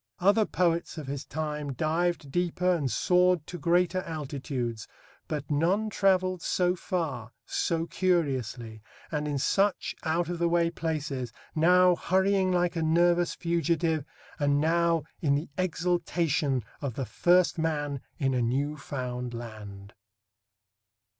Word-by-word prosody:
Other 205 +4 +3
poets 170 -2 0
of 155 - -5
his 135 0 -4
time 150 -2 -4
dived 160 +1 -1
deeper 180 +1 +1
and 145 -7 -1
soared 180 -3 +3
to 175 - -7
greater 175 +3 +2
altitudes, 135 -8 -4 0.4
but 150 -1 -4
none 185 +9 +1
travelled 185 -3 +2
so 180 +1 +1
far, 145 -11 -3
so 165 -1 -1
curiously, 130 - -1 0.3
and 150 -1 -1
in 145 -1 -1
such 195 +8 +1
out 165 +1 0
of 175 -1 -4
the 170 0 +2
way 170 0 +2
places, 150 -7 -3 0.2
now 180 +3 +5
hurrying 190 +1 +2
like 175 -1 +1
a 165 - -1
nervous 175 +2 +3
fugitive, 165 -2 0 0.4
and 145 -1 +2
now 165 0 +2 0.2
in 140 -3 +2
the 150 +4 -3
exultation 170 -6 0 0.2
of 135 -6 -3
the 135 - -2
first 175 +5 +3
man 145 -4 -1 0.2
in 135 -2 0
a 125 - +1
new 140 +6 0
found 125 -3 -5
land. 105 -4 -9
160 Hz, 135 wpm, -28 LUFS, 140-175 Hz, 0.4 s, now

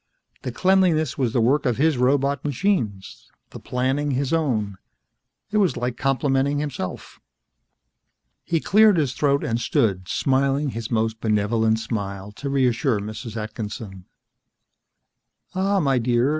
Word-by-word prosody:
The - - -4
cleanliness 185 -6 +2
was 125 -4 0
the 120 - +1
work 135 +6 +2
of 120 - 0
his 155 +2 +3
robot 140 +2 +1
machines, 135 - -2 0.2
the - - -9
planning 130 +4 -1
his 140 +2 -1
own. 110 - -1 0.7
It 210 - +1
was 190 -12 +2
like 125 0 -2
complimenting 135 +1 +1
himself. 145 -11 -5 1.2
He 165 - 0
cleared 210 +2 +5
his 140 -5 +1
throat 140 0 +1
and 115 +1 -1
stood, 95 -7 0
smiling 140 +4 +1
his 115 -1 -5
most 110 -1 -1
benevolent 110 +1 +1
smile 100 -3 -4
to 140 +7 -6
reassure 130 -3 +1
Mrs. 110 +2 -7
Atkinson. 105 -3 -6 1.5
"Ah, 195 +1 +1
my 135 -6 +2
dear. 120 +2 +2
130 Hz, 130 wpm, -23 LUFS, 110-145 Hz, 1.5 s, cleared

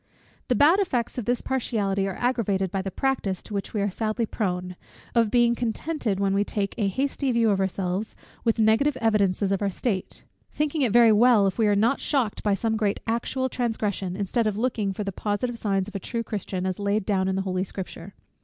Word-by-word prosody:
The 250 - +2
bad 315 - +5
effects 250 - -1
of 230 - -5
this 245 +1 0
partiality 205 -7 0
are 190 - -4
aggravated 205 -7 0
by 195 - -1
the 195 - -4
practice, 200 -5 -1
to - - -9
which 200 -1 -3
we 210 - +1
are 200 0 0
sadly 220 +3 -1
prone, 180 -4 -3 0.4
of 230 -2 +3
being 240 +1 +4
contented, 235 -1 -2
when 195 -1 +1
we 200 +1 +2
take 200 -1 -2
a 205 - +2
hasty 270 +5 -1
view 230 -2 +3
of 195 - +1
ourselves, 190 +2 -2 0.3
with 230 -1 +1
negative 225 +6 +3
evidences 200 -3 +2
of 195 - 0
our 200 - +1
state; 195 0 -3 0.3
thinking 300 0 -1
it 250 -5 +2
very 235 0 +6
well 220 -1 +5
if 195 +3 -1
we 220 - +4
are 205 - +3
not 230 +7 +2
shocked 255 -8 0
by 205 -2 +2
some 220 +2 -1
great 210 -2 0
actual 235 +3 -1
transgression, 210 -7 -2
instead 210 +3 0
of 210 -1 -1
looking 220 -4 0
for 200 +2 -4
the 200 - -3
positive 210 +5 -2
signs 195 -2 0
of 210 - -9
a 200 - -3
true 230 +4 -3
Christian, 190 -4 -4
as 185 0 -2
laid 200 0 0
down 190 -3 +1
in 190 - 0
the 190 - -1
holy 185 -1 -1
Scripture. 190 -1 -7
210 Hz, 215 wpm, -25 LUFS, 195-235 Hz, 0.4 s, very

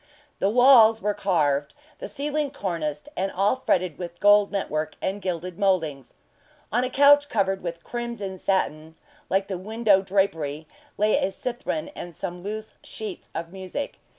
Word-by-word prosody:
The 195 - +2
walls 230 -2 +7
were 210 -1 0
carved, 150 - 0 0.2
the - - -5
ceiling 295 0 -2
corniced, 165 - -4
and 190 +1 -1
all 200 +6 +2
fretted 180 - 0
with 175 -1 -7
gold 205 0 +5
network 155 -6 -2
and 200 +2 -3
gilded 180 0 -4
mouldings. 160 - 0 0.6
On 240 +4 +2
a 255 - -1
couch 285 +2 +5
covered 195 -3 0
with 170 -1 -6
crimson 235 -6 -5
satin, 160 -5 -1 0.3
like 195 +1 +1
the 190 -3 -4
window 215 0 +2
drapery, 165 -6 -1 0.3
lay 210 +1 +3
a - - +1
cithren 250 +8 -4
and 175 -2 -8
some 175 +3 -5
loose 215 +3 -6
sheets 215 -4 -8
of 170 0 -4
music. 190 +9 -5
195 Hz, 150 wpm, -25 LUFS, 175-220 Hz, 0.6 s, walls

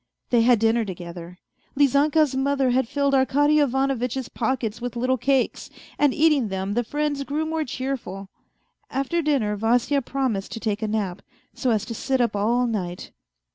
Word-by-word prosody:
They 240 -2 +5
had 240 +1 +5
dinner 225 +2 +2
together. 175 -2 -8 0.4
Lizanka's 285 +1 +3
mother 270 -1 +1
had 255 -1 +1
filled 280 +2 0
Arkady 290 +3 +3
Ivanovitch's 265 -2 0
pockets 235 -2 -2
with 245 0 -4
little 255 +1 0
cakes, 270 +1 0 0.3
and 290 -2 +4
eating 300 -5 +3
them 190 0 -3
the 240 +3 +1
friends 290 +2 -2
grew 295 +3 -2
more 320 0 -1
cheerful. 250 -8 -5 0.6
After 275 +6 -1
dinner 270 -9 +1
Vasya 240 +6 +1
promised 255 -7 -2
to 225 - -5
take 215 -2 -2
a 220 - -1
nap, 205 -4 -2 0.3
so 255 - -1
as 220 -3 +1
to 230 - -5
sit 265 +4 -1
up 235 -4 +1
all 235 +5 +2
night. 185 -6 -4
250 Hz, 165 wpm, -24 LUFS, 220-275 Hz, 0.6 s, They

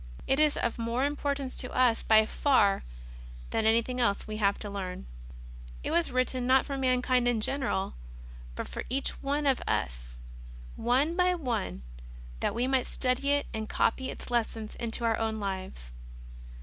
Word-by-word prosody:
It 270 - +2
is 305 -1 +3
of 235 0 -1
more 230 +3 0
importance 280 -2 -2
to 250 - -2
us 245 -3 +3
by 220 -1 +5
far 215 -6 +2 0.7
than 220 -1 +1
anything 230 +3 +2
else 200 -4 +1
we 215 0 -5
have 200 -2 +2
to 210 - -7
learn. 190 - -5 0.8
It - - -2
was 340 +1 +2
written, 255 0 0
not 260 +1 +5
for 275 - -4
mankind 255 -1 +2
in 240 -2 +2
general, 240 -5 0 0.6
but - - -4
for - - -5
each 270 +3 0
of 280 -1 +1
us, - - -2 0.6
one 265 +8 +1
by 360 0 +3
one, 230 - -3 0.6
that - - -1
we 240 +2 +1
might 260 -1 +1
study 255 +2 0
it 285 0 +2
and 220 -1 -4
copy 260 +3 +1
its - - -8
lessons 225 -2 -1
into 235 0 -2
our 225 -1 +1
own 220 -1 -1
lives. 190 - -5
245 Hz, 160 wpm, -29 LUFS, 220-270 Hz, 0.8 s, by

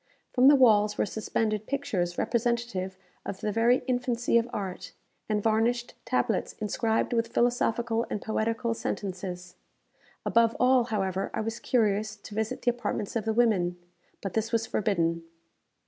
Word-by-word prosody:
From 255 +1 +5
the 290 - +9
walls 210 -5 +4
were - - +2
suspended 215 0 -2
pictures 210 -12 -2
representative 235 -6 -1 0.3
of 190 - -6
the 210 - -1
very 235 +4 +3
infancy 245 -2 0
of 230 +1 -3
art, 195 -6 -5 0.4
and 210 -1 0
varnished 230 +2 +1
tablets - - 0
inscribed 220 +2 -1
with 230 -1 +1
philosophical 235 -1 +1
and - - -2
poetical 225 +2 -1
sentences. 180 -4 -5 0.7
Above 230 0 +3
all, 250 -1 +4
however, 195 -4 -1
I - - -1
was 225 +1 -4
curious 215 -3 +1
to 205 0 -12
visit 220 +1 -2
the 245 - +4
apartments 230 -3 -4
of 225 - -1
the 220 - +1
women; 190 -7 +2 0.5
but 195 - -3
this 225 +1 -1
was 225 -1 +1
forbidden. 170 -7 0
220 Hz, 145 wpm, -28 LUFS, 205-235 Hz, 0.7 s, the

